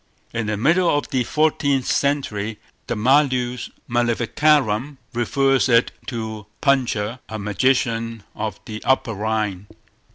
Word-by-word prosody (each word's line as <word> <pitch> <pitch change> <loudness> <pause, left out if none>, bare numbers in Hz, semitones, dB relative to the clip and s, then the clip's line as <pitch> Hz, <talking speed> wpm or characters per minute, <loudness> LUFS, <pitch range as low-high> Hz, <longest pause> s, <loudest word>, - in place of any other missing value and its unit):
In 115 -2 -2
the 105 -1 -1
middle 170 - +3
of 145 - 0
the 130 -2 +1
fourteenth 145 -2 +1
century, 115 -7 0 0.3
the 120 - -1
Malleus 125 0 +2 0.2
Maleficarum 120 +2 +1 0.2
refers 135 +3 +2
it 115 0 +4 0.2
to 110 -3 -5
Puncher, 125 -5 +1
a 110 - -4
magician 115 +1 0
of 105 -2 -4
the 110 0 -7
Upper 130 -3 +2
Rhine. 105 -2 -2
120 Hz, 120 wpm, -22 LUFS, 110-135 Hz, 0.3 s, it